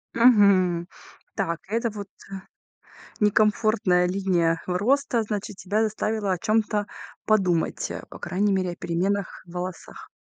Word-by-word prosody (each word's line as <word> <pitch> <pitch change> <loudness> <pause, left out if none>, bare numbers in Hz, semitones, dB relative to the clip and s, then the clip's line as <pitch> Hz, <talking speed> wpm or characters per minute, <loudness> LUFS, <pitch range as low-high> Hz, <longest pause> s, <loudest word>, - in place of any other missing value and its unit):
Мгм. 200 -7 +4 0.5
Так, 170 0 -1
этот 225 0 -1
вот, 200 -1 -6 0.9
э, - - -18 0.2
некомфортная 210 -3 +3
линия 180 -3 +1
роста, 235 +6 +1
значит 210 -2 -4
тебя 205 +4 -1
заставила 215 -2 -1
о 180 - -1
чём-то 215 0 0 0.4
подумать, 185 -6 +1
э, - - -5
по - - -10
крайней 200 +2 0
мере, 185 -2 0
о 175 - -9
переменах 190 +4 -2
в 170 - -14
волосах. 180 0 -7
200 Hz, 130 wpm, -25 LUFS, 180-215 Hz, 0.9 s, Мгм